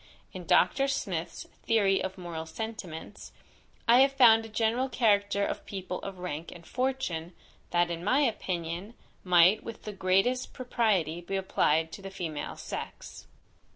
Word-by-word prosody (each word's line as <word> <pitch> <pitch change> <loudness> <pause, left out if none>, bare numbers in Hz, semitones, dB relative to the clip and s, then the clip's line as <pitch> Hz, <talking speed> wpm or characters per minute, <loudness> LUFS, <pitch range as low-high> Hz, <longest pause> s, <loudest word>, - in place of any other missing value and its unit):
In - - -8
Dr. 275 0 +4
Smith's 180 -11 -3 0.2
Theory 200 -4 +2
of 190 0 -4
Moral 170 -3 -6
Sentiments, 205 -1 -7 0.6
I 235 +2 +7
have 270 +1 +5
found 230 -4 +6
a 225 - -9
general 230 +4 0
character 200 -4 +2
of - - -4
people 185 -2 -5
of 195 -1 -7
rank 170 -3 -5
and 170 -1 -12
fortune, 250 -11 -2 0.4
that 175 0 +2
in 170 0 -4
my 260 +9 +3
opinion, 185 - -2 0.3
might 180 +3 +5
with 230 - -8
the 210 - -6
greatest 195 +7 +1
propriety 205 - 0
be 185 +3 -4
applied 160 -4 +1
to 195 - -9
the 195 - -7
female 165 -6 -5
sex. - - -8
195 Hz, 150 wpm, -29 LUFS, 175-225 Hz, 0.6 s, I